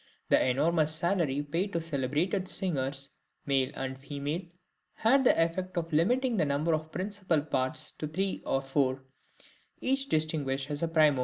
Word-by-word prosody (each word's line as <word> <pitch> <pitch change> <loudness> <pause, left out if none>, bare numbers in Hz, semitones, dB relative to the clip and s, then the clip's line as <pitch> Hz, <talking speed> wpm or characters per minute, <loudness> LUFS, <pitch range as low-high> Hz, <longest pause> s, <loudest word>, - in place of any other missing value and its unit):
The - - +4
enormous 155 +4 +3
salary 160 -5 +1
paid 170 +7 -2
to 170 - +1
celebrated 165 +5 -1
singers, 140 -7 -2 0.4
male 135 -2 +2
and 130 0 -4
female, 145 +4 -3 0.5
had 265 +5 +4
the 250 - +4
effect 180 +3 0
of 165 -1 -2
limiting 240 - +2
the 165 - +3
number 145 +3 +1
of 155 0 -2
principal 185 -3 -1
parts 150 +1 -1
to 155 - -2
three 190 +5 -2
or 135 0 0
four, 135 -1 0 0.8
each 270 +1 0
distinguished 145 -3 0
as 145 +2 -3
primo. 155 -4 +4
155 Hz, 150 wpm, -30 LUFS, 140-180 Hz, 0.8 s, The